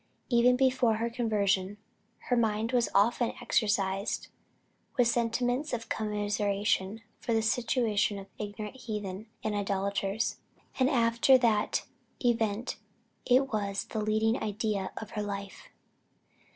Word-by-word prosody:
Even 245 0 +5
before 255 -3 +3
her 230 +2 -2
conversion, 205 -4 0 0.4
her 250 - 0
mind 225 -1 +1
was 245 -2 +2
often 230 +4 +3
exercised 200 -2 0 0.7
with 245 -2 +5
sentiments 245 +4 0
of 230 -1 -4
commiseration 205 0 -1 0.2
for 230 - -1
the 225 - +3
situation 220 -3 +1
of 195 - -7
ignorant 210 +3 -6
heathen 210 -4 -5 0.2
and 215 - -1
idolaters; 200 +1 -1 0.4
and 260 0 +4
after 235 0 +4
that 225 -4 +1 0.4
event 230 0 0 0.5
it 260 +1 +3
was 200 -2 -1
the 220 - -1
leading 220 +2 +1
idea 210 -2 -1
of 220 - -7
her 210 - -3
life. 200 -1 -6
220 Hz, 120 wpm, -30 LUFS, 205-235 Hz, 0.7 s, Even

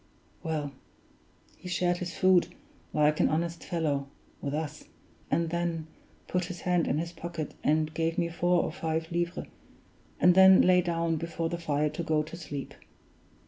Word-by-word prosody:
Well, 155 -4 -2 0.9
he 180 - -9
shared 175 0 +1
his 175 -1 -5
food, 185 -2 +5 0.4
like 150 0 +3
an - - +4
honest 170 +2 -1
fellow, 150 -5 -1 0.3
with 140 - -3
us; 150 0 -4 0.4
and 165 +2 +1
then 170 -2 -1 0.4
put 180 -1 0
his 175 -1 -7
hand 180 -2 +1
in 145 - +1
his 170 +2 -2
pocket, 170 -2 -6
and 155 +1 +2
gave 165 +1 -1
me 170 - +1
four 175 +1 +2
or - - -2
five 160 +1 -3
livres, 170 0 -2 0.7
and 180 - +6
then 190 +1 +8
lay 180 0 +5
down 170 -2 0
before 165 0 -3
the 170 - -3
fire 150 -2 0
to 155 - -4
go 155 -2 +1
to 155 - -9
sleep. 145 -5 -6
165 Hz, 165 wpm, -29 LUFS, 155-175 Hz, 0.9 s, then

